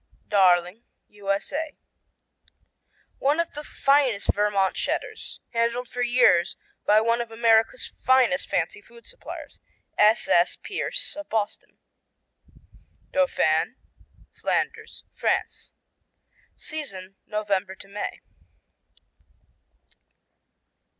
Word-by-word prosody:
Darling 185 +1 +3 0.3
U.S.A. 210 +10 -3 1.4
One 290 +4 +2
of 335 - -1
the 295 - -7
finest 275 -8 +2
Vermont 200 -2 +2
Cheddars, - - -3
handled 235 +1 0
for 245 - -4
years 240 -8 +4 0.3
by 210 +1 +6
one 230 +1 +2
of 235 - -5
America's 225 - +2
finest 260 +1 +3
fancy - - -1
food 480 -1 -18
suppliers, - - -9 0.4
S.S. 210 -5 +4
Pierce - - -3
of 305 0 -8
Boston. 215 -2 -3 1.3
Dauphin 275 -1 +2 0.6
Flanders, - - -2
France - - -2 0.8
Season, 195 -12 -7
November 200 -2 -1
to 195 - -13
May. 205 +1 -5
225 Hz, 85 wpm, -25 LUFS, 200-275 Hz, 1.4 s, by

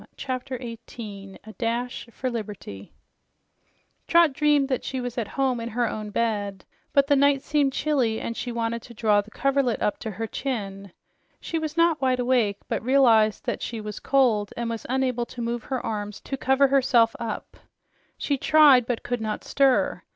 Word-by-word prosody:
CHAPTER 255 0 -4
18 225 -5 -9
A 220 - -11
DASH 240 +1 -3
FOR 255 +2 -3
LIBERTY 205 - -7 1.2
Trot 335 -4 +5
dreamed 295 -1 +3
that 260 -2 -2
she 260 - -3
was 245 -1 -4
at 235 -4 -2
home 265 -3 +1
in 230 0 -4
her 240 +1 0
own 215 -1 -5
bed, 205 -3 -2 0.3
but 280 -1 +4
the 285 - +3
night 280 0 +3
seemed 290 -2 +1
chilly 260 -7 0
and 230 - -4
she 245 - -4
wanted 230 0 -2
to 235 - -13
draw 210 -2 +3
the 205 - -16
coverlet 275 0 0
up 210 - -1
to 220 - -5
her 215 +2 -4
chin. 200 -6 -4 0.5
She 330 - -3
was 315 0 -5
not 335 -2 +3
wide 255 -1 +2
awake, 240 -5 +2
but - - -2
realized 230 -5 +4
that - - -2
she 230 - -4
was 210 -1 -6
cold 235 -7 +2
and 230 -1 -2
unable 255 -2 0
to 250 - -11
move 235 0 -3
her 260 -3 -3
arms 210 -2 -4
to 270 - -4
cover 265 +1 +3
herself 250 -4 +3
up. 225 -3 -5 0.6
She 280 -2 -1
tried, 285 -6 +6
but 245 -2 -2
could 245 -1 -3
not 215 -1 -3
stir. 270 -2 +2
240 Hz, 180 wpm, -25 LUFS, 220-270 Hz, 1.2 s, tried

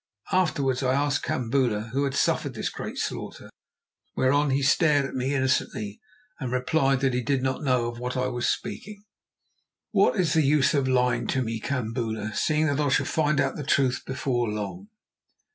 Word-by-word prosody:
Afterwards 145 -8 +1
I 130 0 +1
asked 145 0 0
Kambula 115 -3 0
who 140 +3 0
had 135 - -2
suffered - - 0
this - - -3
great - - -6
slaughter, - - -5 0.6
whereon 145 +3 +2
he 135 +1 +1
stared 145 0 +3
at - - -6
me 130 +2 -1
innocently 110 -6 -1 0.4
and 130 -4 -4
replied 135 +1 +1
that 135 -2 +2
he 125 - 0
did 135 +1 0
not 130 +2 -1
know 125 -4 +2
of 120 0 -6
what 125 +1 -3
I 125 - +1
was 120 -1 -1
speaking. 205 0 -5 0.9
"What - - +3
is 170 -5 +2
the 160 - +4
use 145 -1 +3
of 140 -3 +1
lying 125 -1 +1
to 130 - 0
me, 115 -1 -3
Kambula, 110 -3 -3
seeing 155 +5 +1
that 145 -2 0
I 145 -1 +2
shall 130 - +2
find 150 -2 +1
out - - 0
the 150 - -4
truth 135 -3 +1
before 130 -3 -1
long?" 105 - -5
130 Hz, 180 wpm, -26 LUFS, 125-145 Hz, 0.9 s, the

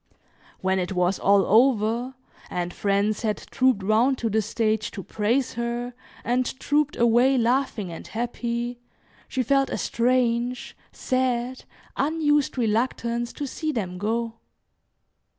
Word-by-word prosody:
When 190 0 +1
it 180 +1 -2
was 180 +1 +1
all 200 -1 +4
over, 235 +2 +3 0.3
and 175 0 -3
friends 200 +1 0
had 215 -2 0
trooped 255 -6 +2
round 230 +6 +3
to 230 -3 -2
the 220 +1 +2
stage 215 0 0
to 195 - -7
praise 230 +8 0
her, 235 +1 -3 0.3
and 250 +2 -1
trooped 295 +1 +1
away, 240 +3 +4
laughing 235 -5 0
and 165 - -8
happy, 240 +1 -3 0.5
she 260 - -1
felt 275 +2 +2
a - - -2
strange, 245 0 0 0.2
sad, 255 -1 -1 0.3
unused 295 -1 +1
reluctance 235 +1 0
to 290 - -4
see 310 +3 -3
them 185 -9 -4
go. 230 +2 -2
235 Hz, 130 wpm, -25 LUFS, 215-255 Hz, 0.5 s, all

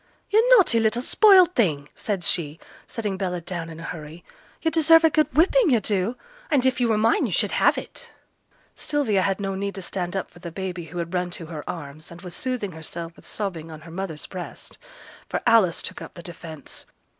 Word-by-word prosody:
'Yo' 425 - +5 0.2
naughty 345 - +5
little 225 +1 +2
spoilt 375 0 +6
thing!' 155 - +1
said 200 -4 -3
she, 155 -3 0 0.3
setting 210 -4 -3
Bella 180 -2 -2
down 170 -1 -5
in 160 0 -9
a - - -8
hurry. 160 0 -8 0.4
'Yo' 325 - +2
deserve 325 0 +6
a 320 - +5
good 310 +1 +2
whipping, 350 - +4
yo' 240 -4 +4
do, 205 +3 -1 0.3
and 275 -4 +2
if 260 -1 +2
yo' 240 - +3
were 220 -2 +2
mine 225 +2 +3
yo' - - -5
should - - +1
have - - +3
it.' - - -7 0.6
Sylvia 275 -10 +1
had 195 +1 0
no 195 -1 -2
need 200 +1 -3
to 195 - -6
stand 175 0 -3
up 190 - -2
for - - -16
the 170 -1 -7
baby 180 -1 -5
who 170 +2 -9
had 170 +1 -4
run 180 -1 0
to 175 -1 -5
her 155 -2 -7
arms, 155 -1 -7
and 170 +1 -12
was 180 -2 -7
soothing 250 -5 -2
herself 165 +1 -7
with - - -15
sobbing 175 -6 -4
on 155 -1 -9
her 165 +1 -12
mother's 170 -4 -4
breast; 180 -2 -8 0.5
for - - -1
Alice 225 -8 +4
took - - -5
up - - -9
the 170 - -10
defence. 165 -4 -8
190 Hz, 215 wpm, -24 LUFS, 170-230 Hz, 0.6 s, spoilt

